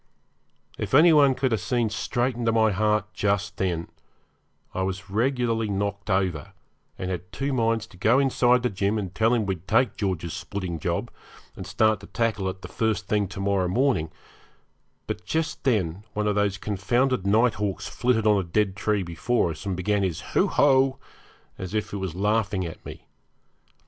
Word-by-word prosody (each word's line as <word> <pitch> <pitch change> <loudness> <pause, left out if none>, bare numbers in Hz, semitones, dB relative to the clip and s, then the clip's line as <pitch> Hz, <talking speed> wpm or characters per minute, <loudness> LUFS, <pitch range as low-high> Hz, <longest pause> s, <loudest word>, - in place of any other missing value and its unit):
If - - -1
any 165 +3 +7
one 140 -3 +5
could 130 0 0
have 110 -4 0
seen 120 -1 0
straight 120 +3 -1
into 115 -1 0
my 110 -1 +3
heart 105 +1 0
just 100 -1 -1
then 85 -3 -1 0.9
I 95 - -2
was 95 0 -4
regularly 115 -1 0
knocked 100 +1 -3
over, 95 -7 -1 0.4
and 95 0 -3
had 90 0 -5
two 135 +4 -2
minds 115 -3 +1
to - - -18
go 110 +7 +3
inside 125 -2 +3
to 125 - +1
Jim 100 +2 0
and 95 -3 -4
tell 110 +3 +2
him 115 -3 +2
we'd 95 -3 -4
take 115 +3 +2
George's 90 -5 -2
splitting 90 -5 -5
job, - - -2 0.4
and - - -8
start 110 -1 +2
to 100 - -12
tackle 110 -5 -1
it 95 -1 -7
first 105 +1 -1
thing 105 -2 +1
to 95 - -8
morrow 100 -2 +1
morning; 115 - +1 1.0
but - - -5
just 160 - -2
then 100 -7 0
one 105 0 -1
of 105 - +2
those 100 -1 +1
confounded 110 +3 0
night 115 +4 +4
hawks 100 -3 -2
flitted 120 -3 0
on 105 -2 +4
a - - -1
dead 95 +3 0
tree 105 0 0
before 85 +3 0
us 80 +5 -8
and 95 -2 -2
began 100 +2 0
his 90 -5 -1
'hoo - - +3
ho', 135 -1 +3 0.6
as 95 +2 -5
if 110 0 -2
it - - -2
was 95 -4 -4
laughing 105 -1 0
at 80 - -8
me. - - -10
105 Hz, 180 wpm, -25 LUFS, 95-115 Hz, 1.0 s, any